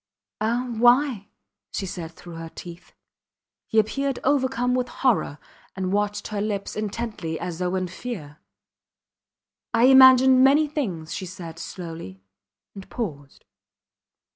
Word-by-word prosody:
Ah 235 +3 0
why? 245 -3 +4 0.4
she 195 - -3
said 175 -3 -6
through 175 +1 -12
her 165 0 -7
teeth. 175 +1 -11 0.8
He 220 - -2
appeared 275 +5 +1
overcome 260 -2 +1
with 250 0 0
horror, 210 - 0 0.4
and 185 0 -2
watched 205 0 -1
her 210 -2 -3
lips 205 -2 -3
intently 210 -6 -4
as 175 -2 -5
though 180 0 -1
in 185 -1 -1
fear. 180 -7 -7 1.4
I 230 - +3
imagined 260 0 +8
many 285 +3 +5
things, 195 - -4
she 185 - -5
said, 170 -3 -9
slowly, 165 - -8 0.5
and 195 -2 -11
paused. 145 - -6
205 Hz, 125 wpm, -24 LUFS, 175-250 Hz, 1.4 s, imagined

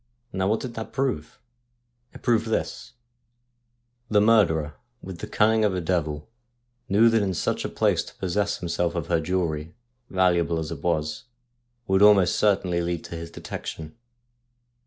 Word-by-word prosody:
Now 95 0 0
what 110 +2 +1
did 125 -2 -6
that 110 -1 -7
prove? 130 - -2 0.7
It - - -14
proved 115 -1 +2
this: 110 - -3 1.2
the 105 - +4
murderer, 90 -9 +3 0.3
with 95 -2 -8
the 105 - -6
cunning 110 +1 +3
of 100 -3 +2
a - - -1
devil, 80 -4 -2 0.6
knew 105 +4 +5
that 115 -1 +3
in 95 -2 -1
such - - -1
a - - -3
place - - +1
to - - -13
possess 100 +2 -1
himself 85 0 -2
of 85 -3 -3
her 85 -2 +2
jewellery, 80 -2 -2 0.3
valuable 90 -3 +2
as 80 0 -4
it 75 -4 -6
was, 80 +6 -1 0.6
would 95 -2 +2
almost 100 -3 +6
certainly 95 -4 +2
lead 85 -1 -2
to - - -8
his 85 0 -7
detection. 80 -1 -7
90 Hz, 155 wpm, -25 LUFS, 85-105 Hz, 1.2 s, almost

